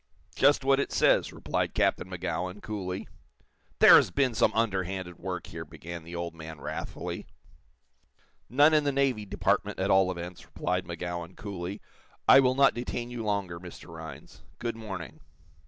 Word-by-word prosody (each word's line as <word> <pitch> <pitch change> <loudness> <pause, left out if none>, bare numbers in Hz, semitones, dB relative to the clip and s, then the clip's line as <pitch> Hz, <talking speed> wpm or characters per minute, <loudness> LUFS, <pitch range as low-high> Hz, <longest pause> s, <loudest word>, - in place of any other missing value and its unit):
"Just 140 0 +4
what 135 0 +4
it - - -1
says," - - +3
replied - - -2
Captain 95 - +1
Magowan, 90 +1 -3
coolly. 95 -4 -5 0.7
"There - - +10
has - - +3
been 135 -3 +1
some 110 - +3
underhanded 95 -5 -1
work 90 -1 -4
here!" 80 0 -7
began 85 +2 -9
the 85 +2 -9
old 85 -1 -4
man, 80 -2 -9
wrathfully. - - -5 1.2
"None 145 +5 +5
in 155 -1 +4
the 145 - +1
Navy 135 -6 +1
Department, - - 0
at 95 +1 +1
all 95 -1 +5
events," 90 0 -6
replied 90 -1 -2
Magowan, 85 0 -5
coolly. 100 -1 -6 0.5
"I 135 - +9
will 130 -1 +3
not 140 0 +5
detain 120 0 -4
you 120 -2 -4
longer, 100 -5 -2
Mr. 90 -1 -11
Rhinds. 80 -4 -10 0.2
Good 120 -1 -3
morning." 95 -7 -7
95 Hz, 155 wpm, -28 LUFS, 85-120 Hz, 1.2 s, There